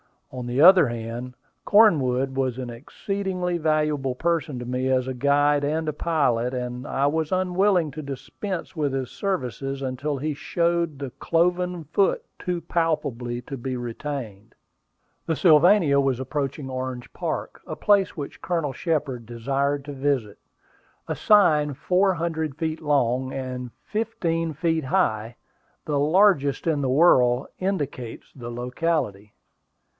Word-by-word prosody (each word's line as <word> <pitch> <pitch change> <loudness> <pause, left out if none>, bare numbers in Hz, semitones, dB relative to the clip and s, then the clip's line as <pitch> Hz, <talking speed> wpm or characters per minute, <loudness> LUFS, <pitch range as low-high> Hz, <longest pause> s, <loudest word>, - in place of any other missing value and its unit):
On 125 -2 -6
the 125 +3 0
other 180 -2 +8
hand, 120 +2 -5 0.3
Cornwood 135 - +4
was 130 -2 -1
an 125 -2 -5
exceedingly 180 - -3
valuable 150 -4 0
person 160 -2 -1
to 125 - -6
me 125 +1 -1
as 130 -1 +1
guide 145 +3 +2
and 155 +1 -1
pilot, 125 -7 +1
and 125 +2 -4
I 135 - 0
was 155 +1 0
unwilling 185 -2 +2
to 155 - -6
dispense 160 +7 -6
with 145 -4 -1
his 130 -2 -3
services 135 - -3
until 135 +3 -2
he 150 +3 -2
showed 170 0 0
the 135 -2 -5
cloven 180 +1 +1
foot 180 +6 +1 0.2
too 180 -1 -2
palpably 135 -8 -1
to 135 +3 -7
be 130 +1 -4
retained. 120 -3 -6 0.7
The 165 - +1
Sylvania 160 -2 +5
was 135 -3 +1
approaching 140 +1 -3
Orange 130 -1 -5
Park, - - -4
a - - -4
place 200 -3 +2
which 145 -2 -7
Colonel 165 -6 -1
Shepard 140 -6 -2
desired 135 +4 -1
to 145 - -6
visit. 135 -6 -1 0.7
A - - +1
sign 155 -9 +4
four 185 +7 +2
hundred 160 -4 -2
feet 160 0 -3
long, 130 -3 +1
and 130 -2 -5
fifteen 175 -8 -2
feet 160 0 0
high, 120 - 0 0.5
the 145 -2 0
largest 150 -3 +3
in 155 -4 +1
the 135 - 0
world, 130 -4 +4
indicates 145 - -3
the 120 -3 -8
locality. 120 -4 -2
145 Hz, 135 wpm, -24 LUFS, 130-165 Hz, 0.7 s, other